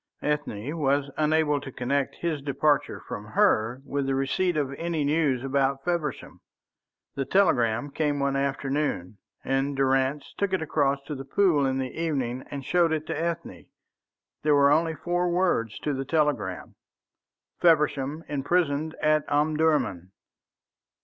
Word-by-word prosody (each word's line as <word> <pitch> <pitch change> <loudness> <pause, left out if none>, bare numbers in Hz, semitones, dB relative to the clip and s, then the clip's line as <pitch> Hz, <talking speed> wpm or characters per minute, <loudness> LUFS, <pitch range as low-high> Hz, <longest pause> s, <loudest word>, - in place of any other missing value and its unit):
Ethne 150 -2 -2
was 140 0 +1
unable 150 -1 +2
to 135 - -8
connect 135 +3 -1
his 160 -4 -2
departure 145 +1 +1
from 105 - -5
her 110 +4 +1
with 140 -1 -2
the 135 - +1
receipt 155 +6 0
of 140 -2 -1
any 165 0 -2
news 145 -4 +1
about 135 0 0
Feversham. 170 -6 -3 0.7
The 140 - -2
telegram 135 - +2
came 145 -1 0
one 140 0 0
afternoon, 135 -7 -2 0.2
and 135 +1 -1
Durrance 135 +1 +1
took 200 -2 0
it 190 - +1
across 140 -3 0
to 150 - -6
The 135 -1 -6
Pool 145 -1 +2
in 130 0 0
the 130 -1 -3
evening 135 -7 -2
and 140 -2 -6
showed 170 +1 +3
it 155 -1 -1
to - - -3
Ethne. 170 +1 -4 0.7
There 150 -1 +3
were 140 0 +5
only 160 +2 +2
four 175 +3 -1
words 170 - +1
to 150 - -1
the 135 0 -2
telegram: 150 0 -1 0.9
"Feversham 150 -2 +2
imprisoned 150 +1 0
at 155 0 +3
Omdurman." 150 - +1
145 Hz, 145 wpm, -26 LUFS, 135-155 Hz, 0.9 s, were